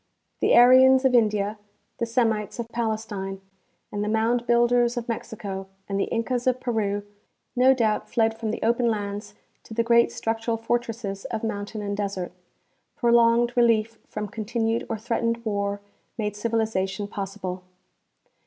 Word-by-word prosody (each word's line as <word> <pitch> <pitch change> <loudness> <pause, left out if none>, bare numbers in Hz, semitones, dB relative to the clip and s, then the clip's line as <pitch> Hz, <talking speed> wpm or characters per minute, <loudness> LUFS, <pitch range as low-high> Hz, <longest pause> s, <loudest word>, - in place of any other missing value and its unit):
The - - +4
Aryans 260 +2 +7
of 260 - +4
India, 210 -2 +2 0.4
the 235 - -1
Semites 225 -3 0
of 235 -1 -4
Palestine, 215 -4 -3 0.5
and 205 0 -2
the 210 - -1
mound 230 +2 +1
builders 240 0 +3
of 235 - -3
Mexico 200 -4 -5 0.2
and 195 0 -2
the - - +2
Incas 240 +2 -2
of 255 0 +2
Peru 210 -5 -1 0.5
no 260 +2 +5
doubt 220 -4 0
fled 225 -2 +1
from 225 -1 -4
the 220 - -3
open 235 +2 +2
lands 205 -1 -3 0.3
to 220 - -11
the 230 - +2
great 235 0 +4
structural 225 +1 -2
fortresses 225 -3 -3
of 225 -1 -4
mountain 210 0 -4
and 200 0 -2
desert. 200 -3 -3 0.6
Prolonged 235 0 +3
relief 230 -2 +2
from 210 0 -4
con 215 +1 -6
tinued 225 0 -1
or 225 - -2
threatened 230 +1 -1
war 200 -1 -1 0.4
made 210 -2 -2
civilization 210 -3 -1
possible. 195 -2 -5
225 Hz, 150 wpm, -25 LUFS, 205-235 Hz, 0.6 s, Aryans